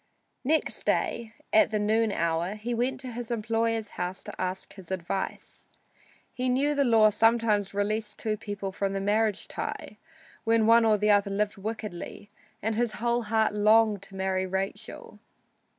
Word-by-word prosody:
Next 310 +4 0
day, 230 -1 -1 0.2
at 215 - +6
the 215 - 0
noon 215 +1 +2
hour, 170 +2 -1
he 225 +3 -4
went 245 +3 -1
to 255 -2 -6
his 240 0 -6
employer's 225 -1 -1
house 180 +1 -4
to - - -8
ask 185 +1 -4
his 190 -4 -12
advice. 190 +1 -4 0.6
He 255 0 -1
knew 275 +4 +2
the 285 -1 +2
law 225 -4 +5
sometimes 220 -3 +2
released 210 +1 -1
two 215 -1 -1
people 205 -2 -5
from 195 +1 -2
the 195 - -1
marriage 210 +1 0
tie - - -6 0.4
when 225 -1 +3
one 230 +1 +6
or 215 -1 +4
the 210 +1 +3
other 205 0 +3
lived 205 +2 -1
wickedly, 205 -1 -6 0.3
and 220 +2 0
his 230 0 0
whole 240 +1 0
heart 220 -1 +1
longed 215 -1 +4
to 200 -1 -11
marry 190 0 -1
Rachel. 190 +1 -5
215 Hz, 165 wpm, -27 LUFS, 200-230 Hz, 0.6 s, at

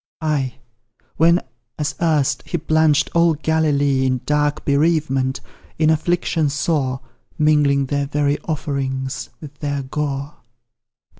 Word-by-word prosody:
Ay, 145 -5 -1 0.6
when, 170 +2 +5 0.4
as 150 0 -2
erst, 155 -5 +2
he 175 - -1
plunged 155 -2 +2
all 170 -1 +4
Galilee 145 -3 +1
In 130 -1 0
dark 150 0 0
bereavement 140 -3 +1 0.4
in 155 0 +3
affliction 160 -1 +1
sore, 140 -3 -1 0.4
Mingling 145 -2 +3
their 140 +1 -1
very 145 0 0
offerings 140 -3 -3
with 145 -2 -11
their 145 -2 -2
gore. 140 +1 -4
145 Hz, 115 wpm, -20 LUFS, 140-155 Hz, 0.6 s, when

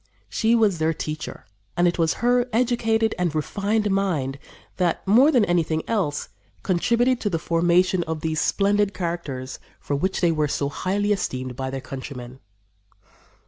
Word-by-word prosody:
She 225 +1 +2
was 210 -7 +2
their 160 0 +1
teacher; 155 0 -6 0.3
and 175 0 +4
it 175 - -1
was 165 -1 +2
her 245 0 +3
educated 225 -2 +1
and 175 -3 0
refined 205 +7 0
mind 155 -9 -1 0.4
that, 175 -3 0
more 245 +9 +6
than 245 -7 +4
anything 165 -3 0
else, 175 -10 -1 0.3
contributed 235 +7 +2
to 205 - 0
the 170 - 0
formation 175 +3 +2
of 160 -1 -4
those 160 -1 -1
splendid 205 0 +1
characters 155 -7 -4 0.2
for 145 - -2
which 185 +7 -1
they 175 -2 +3
were 155 -2 +1
so 140 0 -1
highly 200 +6 -1
esteemed 130 -10 -2
by 130 +1 -3
their 135 0 -4
countrymen. 130 -1 -8
175 Hz, 155 wpm, -23 LUFS, 155-205 Hz, 0.4 s, more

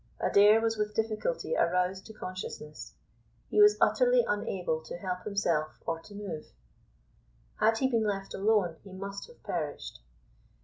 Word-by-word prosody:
Adair 210 +2 +6
was 225 0 0
with 210 0 -2
difficulty 225 - -1
aroused 180 - +1
to - - -9
consciousness. 185 -6 -7 0.6
He 420 - +5
was 415 0 +7
utterly - - +4
unable 180 -6 -1
to - - -6
help 180 0 -4
himself 170 -7 0
or 165 0 -2
to 200 +5 -14
move. 200 -7 -6 1.1
Had 225 +1 +3
he 265 - +2
been 230 -4 +1
left 195 -1 -3
alone 195 -5 +2
he 195 - -12
must 200 - -6
have 480 - -19
perished. - - -4
200 Hz, 145 wpm, -30 LUFS, 180-225 Hz, 1.1 s, was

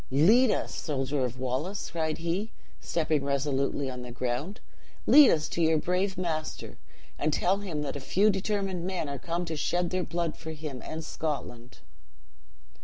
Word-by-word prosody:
Lead 215 - +5
us, - - -1
soldier 135 -2 -1
of 125 0 -4
Wallace,' 130 +10 -3
cried 160 -2 -1
he, 175 +6 -2 0.3
stepping 155 -3 0
resolutely 140 0 0
on 125 -1 -5
the 125 - -7
ground, 125 - -3 0.5
'lead 295 -2 +9
us 155 -1 +2
to 170 - -2
your 160 -1 +4
brave 185 +4 0
master; 160 -4 -3 0.4
and 155 - +1
tell 180 +6 +2
him 170 -7 -3
that 140 -1 -3
a - - -3
few 200 +10 +3
determined 195 -2 -1
men 180 -4 -2
are 140 -1 -4
come 170 +4 -2
to 165 -1 -3
shed 175 +3 0
their 185 -1 0
blood 170 -2 -2
for 160 -1 -7
him 150 -4 -6
and 160 0 -5
Scotland.' 125 - -5
160 Hz, 170 wpm, -29 LUFS, 140-180 Hz, 0.5 s, lead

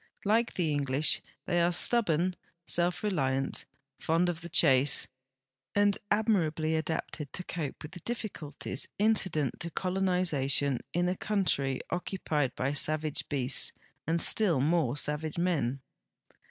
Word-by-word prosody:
Like 225 +3 +2
the 165 -4 0
English, 145 0 +3 0.2
they 175 -1 +1
are 170 +1 +3
stubborn, 180 -3 +2 0.3
self 175 +2 +2
reliant, 135 -9 -1 0.3
fond 165 +2 +1
of 170 -1 -4
the 170 - -6
chase, 140 -4 +4 0.7
and 205 0 +4
admirably 165 -8 +1
adapted 160 -2 -3
to 180 - -1
cope 165 -5 -5
with 150 - -8
the 175 - -9
difficulties 165 - -4
incident 190 - +1
to 170 - -1
colonization 170 -8 +1
in 175 +1 0
a 180 - 0
country 180 -11 0
occupied 155 -7 -2
by 135 +2 -1
savage 155 +1 0
beasts 135 -1 0 0.3
and 165 +1 +1
still 180 -5 +3
more 150 -2 +1
savage 150 +2 -1
men. 145 -7 0
160 Hz, 125 wpm, -30 LUFS, 145-180 Hz, 0.7 s, chase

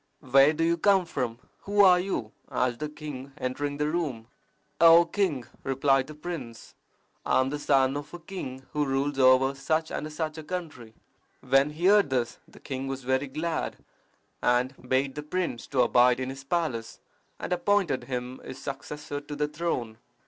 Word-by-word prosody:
"Where 135 +1 +5
do 160 +1 -1
you 170 +1 +2
come 195 0 +4
from? 120 -7 -3 0.3
Who 205 0 +4
are 180 -2 +7
you?" 180 - -3 0.2
asked 125 -2 0
the 150 - -3
king, 145 -3 -8
entering 145 +2 -3
the 150 0 0
room. 145 -9 -2 0.5
"O 170 +1 +8
king!" 165 -8 -1 0.2
replied 135 0 +2
the 155 - -9
prince, 150 -8 -7 0.5
"I - - +2
am 130 +1 +1
the 145 - -3
son 135 -2 +3
of 145 0 -6
a 175 - -7
king 135 -7 -7
who 150 -1 +1
rules 135 0 -1
over 130 +1 +5
such 155 +3 -1
and 155 - -4
such 155 0 -4
a - - -8
country." 150 -10 -6 0.5
When 135 +2 +3
he 155 +4 -4
heard 200 -3 +5
this 125 -3 -1
the - - -17
king 135 -1 -5
was 135 -1 -4
very 130 +2 0
glad, 160 +5 -3 0.6
and 125 +2 +2 0.2
bade 135 +1 +1
the 150 - -5
prince 150 -5 -3
to 130 -3 +2
abide 125 0 +4
in 130 0 -3
his 135 0 -9
palace, 135 -8 -2 0.4
and - - -2
appointed 180 -8 +1
him 125 0 -5
his 130 - -8
successor 145 +2 -6
to 145 0 -7
the 150 0 0
throne. 150 -8 -3
145 Hz, 180 wpm, -27 LUFS, 130-160 Hz, 0.6 s, O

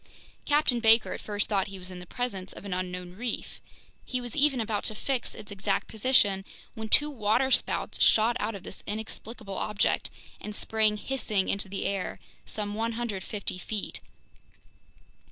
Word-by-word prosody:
Captain 290 -5 +3
Baker 225 0 +6
at - - -6
first 205 -1 -1
thought 200 -1 +1
he 195 0 -7
was 185 0 -8
in 180 - -7
the 180 - -10
presence 195 -6 -3
of - - -10
an 195 - -3
unknown 180 -1 -4
reef; 235 +5 -4 0.4
he 255 - -2
was 245 -2 -6
even 285 -3 +4
about 215 -2 -1
to 215 - 0
fix 260 +2 -2
its 210 - -9
exact 200 0 -1
position 210 -4 +4 0.3
when 220 -1 -6
two 295 - +6
waterspouts 250 +2 +1
shot 225 +2 +6
out 215 +1 -1
of 195 - -8
this - - -8
inexplicable 215 -1 -5
object 210 0 +1 0.3
and 210 0 -6
sprang 215 -1 +2
hissing 210 -5 0
into 200 0 -1
the 195 - -3
air 195 -2 -2 0.3
some 205 -1 -2
150 220 -4 -2
feet. 210 +2 -4
210 Hz, 160 wpm, -29 LUFS, 195-235 Hz, 0.4 s, Baker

